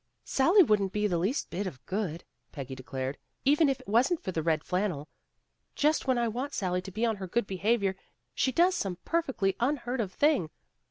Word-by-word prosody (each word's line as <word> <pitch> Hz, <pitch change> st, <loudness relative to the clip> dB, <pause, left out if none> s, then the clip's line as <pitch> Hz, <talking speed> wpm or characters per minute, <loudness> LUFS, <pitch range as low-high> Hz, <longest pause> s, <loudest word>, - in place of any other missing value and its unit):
"Sally 345 Hz, +9 st, +5 dB
wouldn't 205 Hz, -, +1 dB
be 210 Hz, 0 st, 0 dB
the 175 Hz, -5 st, +1 dB
least 205 Hz, -, -1 dB
bit 195 Hz, +2 st, -2 dB
of 135 Hz, -9 st, -9 dB
good," 185 Hz, -5 st, -3 dB, 0.3 s
Peggy 135 Hz, -2 st, -6 dB
declared, 130 Hz, +1 st, -5 dB, 0.3 s
"even 295 Hz, +2 st, +5 dB
if 270 Hz, -, 0 dB
it -, -, -16 dB
wasn't 250 Hz, -, +3 dB
for 185 Hz, -, -2 dB
the 165 Hz, -, -1 dB
red 160 Hz, -1 st, +1 dB
flannel. 180 Hz, -6 st, -1 dB, 0.7 s
Just 300 Hz, -1 st, +2 dB
when 260 Hz, -1 st, +3 dB
I 235 Hz, -1 st, +1 dB
want 255 Hz, +6 st, -3 dB
Sally 180 Hz, -2 st, 0 dB
to 195 Hz, -, -9 dB
be 220 Hz, +5 st, 0 dB
on 225 Hz, -2 st, 0 dB
her 190 Hz, -1 st, -6 dB
good 235 Hz, +6 st, 0 dB
behavior, 195 Hz, +1 st, 0 dB, 0.4 s
she 260 Hz, -, +1 dB
does 350 Hz, +6 st, +4 dB
some 195 Hz, -, -2 dB
perfectly 265 Hz, -, 0 dB
un 260 Hz, +5 st, +2 dB
heard 245 Hz, 0 st, -3 dB
of 195 Hz, -4 st, -3 dB
thing. 285 Hz, -, +2 dB
210 Hz, 205 wpm, -29 LUFS, 180-265 Hz, 0.7 s, Sally